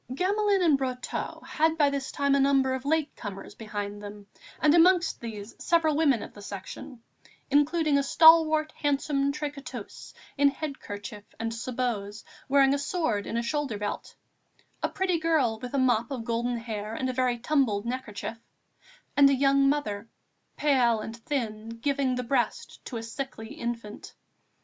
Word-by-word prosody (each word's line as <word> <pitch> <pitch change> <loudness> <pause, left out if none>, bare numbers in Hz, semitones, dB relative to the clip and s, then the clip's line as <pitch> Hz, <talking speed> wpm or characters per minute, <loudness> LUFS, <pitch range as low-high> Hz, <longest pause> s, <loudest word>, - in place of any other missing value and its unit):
Gamelin 400 +2 +2
and 300 -5 +4
Brotteaux 255 -2 -4
had 320 +1 +1
by 290 -3 +4
this 275 -1 -3
time 280 -1 +1
a 280 - +4
number 270 -1 +3
of 260 +1 -4
late 310 0 0
comers 200 -3 -8
behind 205 -2 -5
them 205 0 -9 0.3
and 300 0 +4
amongst 345 +1 +4
these 215 -2 -7
several 325 -3 +2
women 285 -7 +3
of - - -10
the 205 - -12
Section, 200 +5 -8 0.5
including 295 0 +3
a - - +2
stalwart, 315 +1 +6
handsome 280 -1 0
tricoteuse, 290 -1 -7 0.3
in 285 0 +6
head 280 0 -5
kerchief 205 0 -8 0.2
and 225 0 -2
sabots, 230 -3 -3 0.3
wearing 275 0 +5
a 285 - 0
sword 280 - -1
in 230 - -2
a 235 - 0
shoulder 270 -2 -2
belt, 205 0 -5 0.7
a - - 0
pretty 370 -3 0
girl 300 -9 +1
with 250 +2 -5
a - - +2
mop 245 -3 +2
of 250 -5 -5
golden 240 +1 -1
hair 220 -2 -5
and 260 - -2
a 255 - -2
very 250 -1 +1
tumbled 235 -5 +1
neckerchief, 235 -2 -5 0.8
and 280 -1 +7
a 275 - +3
young 275 +1 +4
mother, 230 -7 -2 0.5
pale 250 -6 +3
and 220 +1 -6
thin, 225 -3 -4
giving 275 0 0
the 250 - -2
breast 245 0 -2
to 245 - -5
a 225 - -5
sickly 230 0 -6
infant. 235 -7 -6
260 Hz, 165 wpm, -27 LUFS, 225-290 Hz, 0.8 s, and